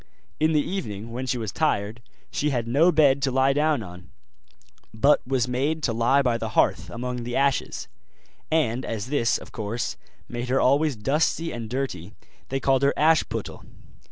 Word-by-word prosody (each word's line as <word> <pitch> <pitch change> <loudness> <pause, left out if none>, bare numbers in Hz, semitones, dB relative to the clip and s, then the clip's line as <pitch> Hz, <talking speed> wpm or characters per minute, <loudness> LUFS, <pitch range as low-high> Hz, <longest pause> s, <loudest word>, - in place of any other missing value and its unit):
In 155 +1 +2
the 150 - +4
evening 115 - -5
when 130 +2 -4
she 125 0 0
was 110 -4 -4
tired, 105 +3 -1 0.3
she 150 - 0
had 120 -5 -1
no 150 +9 +4
bed 140 -4 +4
to 135 - +1
lie 135 +1 +3
down 150 -3 +1
on, 90 -1 -12 0.8
but 140 +7 +3
was 130 -2 +1
made 145 +5 -1
to 115 - +1
lie 120 +5 +3
by 120 -2 +1
the 110 - -3
hearth - - +2
among 125 +1 -4
the 120 0 -4
ashes; 140 -1 0 0.6
and 130 -6 +1
as 110 -2 -4
this, 115 -6 +2
of - - -12
course, 110 +1 -4 0.3
made 120 +1 -5
her 135 +1 +2
always 145 +2 +3
dusty 150 +8 0
and 115 -2 -6
dirty, 115 -7 -4 0.3
they 135 - -1
called 135 0 +2
her 140 0 +2
Ashputtel. 160 +1 +1
130 Hz, 175 wpm, -25 LUFS, 115-145 Hz, 0.8 s, the